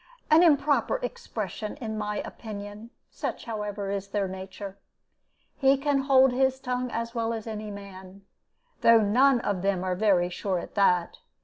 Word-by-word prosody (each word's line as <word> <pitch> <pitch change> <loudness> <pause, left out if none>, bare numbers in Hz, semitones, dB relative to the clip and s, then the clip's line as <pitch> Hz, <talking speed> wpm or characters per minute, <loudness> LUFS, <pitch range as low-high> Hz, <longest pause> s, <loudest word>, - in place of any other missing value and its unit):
an 315 +2 +7
improper 300 - +3
expression, 215 - -5
in 220 -3 -5
my 210 -1 -3
opinion; 210 0 -8 0.2
such, - - -5
however, 210 -3 -4
is 200 0 -3
their 200 -1 -1
nature. 190 +1 -8 0.8
He 275 0 +4
can 280 0 +1
hold 265 -1 +5
his 265 +1 +1
tongue 250 -1 -2
as 230 0 -4
well 230 -1 -1
as 225 -2 -5
any 215 -1 -5
man, 195 -1 -10 0.6
though 230 -1 +6
none 245 +5 +4
of 200 -6 -1
them 190 -1 0
are 185 -1 0
very 185 -3 +2
sure 190 +1 -2
at - - -7
that. 180 -4 +2
215 Hz, 155 wpm, -27 LUFS, 200-255 Hz, 0.8 s, an